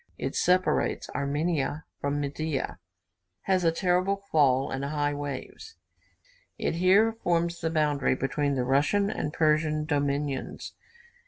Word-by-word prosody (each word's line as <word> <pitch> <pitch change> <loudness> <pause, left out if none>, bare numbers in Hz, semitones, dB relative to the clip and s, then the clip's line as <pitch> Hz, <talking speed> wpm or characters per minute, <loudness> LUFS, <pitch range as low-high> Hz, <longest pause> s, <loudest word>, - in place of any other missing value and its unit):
It - - -4
separates 180 +1 +1
Armenia 145 +1 -1
from 140 +1 -1
Media, 145 0 -3 0.6
has 185 -2 +1
a 165 - +4
terrible 180 +3 +1 0.2
fall, 135 -3 +3
and 135 +1 -3
high 145 0 -1
waves. 145 - -6 0.8
It - - -1
here 195 +5 +5
forms 170 -5 -1
the 160 - 0
boundary 150 -5 +1
between 140 +2 -1
the 125 -2 0
Russian 150 +10 +2
and 150 - -3
Persian 155 -1 +1
dominions. 145 -2 -2
150 Hz, 120 wpm, -27 LUFS, 140-170 Hz, 0.8 s, here